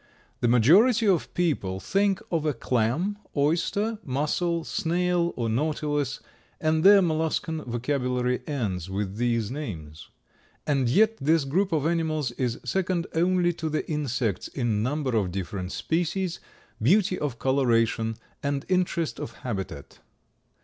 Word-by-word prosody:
The 120 - +1
majority 200 - +5
of 185 -5 +2
people 135 - 0
think 195 - +1
of 165 -3 +1
a 150 -3 0
clam, 130 - 0 0.2
oyster, 190 +9 +1
mussel, 155 +5 -1
snail 175 +1 0
or 115 - -1
Nautilus 145 +2 -1 0.4
and 155 0 +1
their 200 0 +8
molluscan 160 -1 -1
vocabulary 125 0 -1
ends 100 - -2
with 100 +1 -3
these 115 -2 0
names. 80 - -7 0.6
And 135 -5 +1
yet 220 - +4
this 155 +1 +2
group 185 +8 +1
of 155 -3 +1
animals 160 -5 0
is 120 -1 -2
second 185 -2 0
only 175 +1 +2
to 160 -1 -4
the 155 - -2
insects 125 - -1
in 115 -6 -1
number 130 +1 -1
of 100 -4 +1
different 95 0 -4
species, 175 +2 -1 0.4
beauty 185 - +3
of 140 -5 -3
coloration 115 -4 +1 0.3
and 140 -1 -2
interest 180 -3 0
of 115 - -6
habitat. 95 - -5
145 Hz, 130 wpm, -26 LUFS, 120-170 Hz, 0.6 s, their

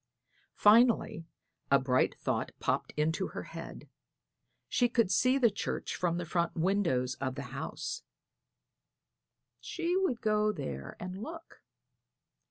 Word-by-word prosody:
Finally 215 -6 +4 0.4
a 140 - +6
bright 130 -1 +2
thought - - -1
popped - - -1
into 155 +2 +1
her - - -6
little - - -12
head. - - -11 0.8
She 245 -1 +2
could 230 -6 +2
see 255 +1 +4
the 240 -5 +4
church 200 - -3
from 175 -2 0
the 175 - -3
front 170 +1 -1
windows 165 -9 +1
of 130 -2 -2
the 140 - -5
house; 480 0 -4 1.6
she 350 0 -2
would 370 -11 +1
go 215 -1 +2
there 70 - -6
and 185 +2 -6
look. 330 +6 -9
195 Hz, 130 wpm, -31 LUFS, 160-240 Hz, 1.6 s, a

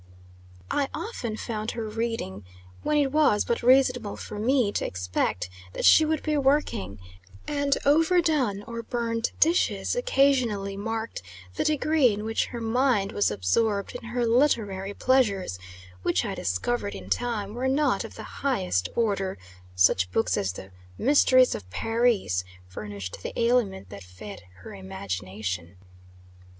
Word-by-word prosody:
I 280 -2 0
often 235 - -4
found 215 -1 -4
her 225 -1 -3
reading, 220 - -3 0.4
when 300 - +1
it 280 -2 +2
was 290 -8 +3
but 235 - -1
reasonable 250 -3 +3
for 210 - -7
me 245 -1 +2
to - - -2
expect 90 0 -2 0.3
that - - -2
she 315 - +7
would 310 -1 -1
be 305 -1 0
working; 270 - +1 0.5
and 285 -1 +1
overdone 305 - +3
or 230 +1 -6
burnt 230 0 -2
dishes 335 +8 +2
occasionally 255 - +2
marked 225 +2 -4 0.3
the - - -1
degree 305 -3 +3
in 210 +1 -4
which 225 +1 0
her 240 - -6
mind 230 -3 +1
was 205 - +2
absorbed 200 - 0
in 245 -1 -8
her 240 +1 -1
literary 215 -6 +1
pleasures, 200 - +1 0.4
which - - +1
I - - -3
discovered 100 +3 -2
in 95 -1 -9
time, 210 - -2
were 250 +3 -2
not 285 +3 +2
of - - -9
the - - -8 0.2
highest 90 - 0
order 200 -5 0 0.4
such 90 0 +3
books 95 -2 +1
as 95 -2 -1
the 95 +2 -10 0.3
"Mysteries 255 -2 +5
of 95 -4 -7
Paris" 225 - +1 0.2
furnishing 100 0 -7
the - - -5
aliment 230 - +1
that 100 0 -9
fed 90 +1 -10 0.2
her - - -10
imagination. 95 -1 -5
225 Hz, 140 wpm, -26 LUFS, -, 0.5 s, she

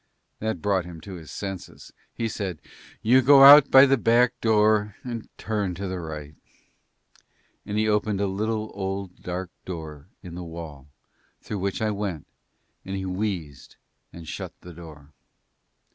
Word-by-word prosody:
That 110 -6 -3
brought 95 -3 +1
him 85 -2 -9
to 95 +4 -9
his 80 -4 -10
senses. 95 +4 -8 0.2
He 115 - -3
said, 95 -7 -4 0.4
"You 125 +4 +5
go 135 +1 +7
out 140 0 +10
by 135 +1 +8
the 135 0 +3
back 120 +2 +3
door 105 -2 +2
and 120 -3 -6
turn 105 -5 -2
to 100 +2 -5
the 95 -1 -4
right"; 75 -3 -7 1.3
and 105 0 -3
he 110 0 +2
opened 105 -1 0
a 100 - +1
little, 110 +3 -2
old, 95 -1 -5
dark 90 0 -5
door 80 -4 -8 0.2
in 90 -3 -9
the 90 - -6
wall 80 -5 -9 0.5
through 105 - -6
which 100 +3 -2
I 110 - +1
went, 100 -7 -4 0.6
and 95 - -5
he 95 -1 -4
wheezed 90 - -4 0.4
and 85 -2 -11
shut - - -6
the 90 - -11
door. 80 -3 -13
95 Hz, 160 wpm, -25 LUFS, 85-110 Hz, 1.3 s, out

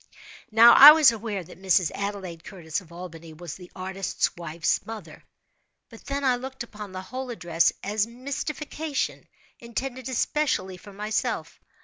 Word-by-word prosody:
Now, 230 +1 +8
I 295 +2 +12
was 305 -5 +6
aware 215 -4 -4
that 180 +2 -15
Mrs. 185 -3 +2
Adelaide 195 -5 -5
Curtis, 175 -2 -5
of 170 -3 -19
Albany, 165 -2 -10
was 170 0 -8
the 180 -2 -13
artist's 190 0 -2
wife's 170 -1 -1
mother,—but 220 +3 -14
then 280 0 -3
I 255 -2 +3
looked 260 0 -7
upon 210 -4 -10
the 185 0 -7
whole 255 +6 -6
address 170 -8 +1
as 210 +2 0
a - - -14
mystification, 285 +4 -4 0.3
intended 250 +2 -5
especially 250 -8 -1
for 205 - -13
myself. 210 +2 -3
205 Hz, 145 wpm, -25 LUFS, 180-255 Hz, 0.3 s, I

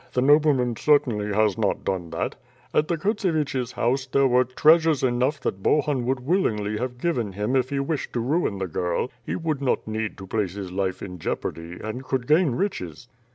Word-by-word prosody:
The 125 - +1
nobleman 140 -4 +4
certainly 120 -8 +2
has 105 +1 +2
not 105 -3 0
done 90 -3 -2
that. 80 - -2 0.4
At 150 - +2
the 170 - 0
Kurtseviches' 155 - -1
house, 130 +2 0
there 140 +1 +3
were 125 0 +4
treasures 155 +3 +4
enough 130 +3 +1
that 95 - -3
Bohun 140 -1 +1
would 130 -1 0
willingly 110 - 0
have 125 0 -3
given 120 - -1
him 105 +6 -1
if 130 -1 +2
he 140 - -1
wished 140 +2 -2
to 120 - -1
ruin 130 - 0
the 95 - -2
girl. 90 +6 -2
He - - -3
would 155 -5 -2
not 130 -5 0
need 110 0 -3
to 95 - -8
place 100 -2 -1
his 95 -3 -6
life 95 0 -2
in 90 -2 -7
jeopardy, 85 +2 -4
and 110 +5 -5
could 130 -1 -2
gain 150 -2 +3
riches." 120 - -3
125 Hz, 195 wpm, -24 LUFS, 105-145 Hz, 0.4 s, nobleman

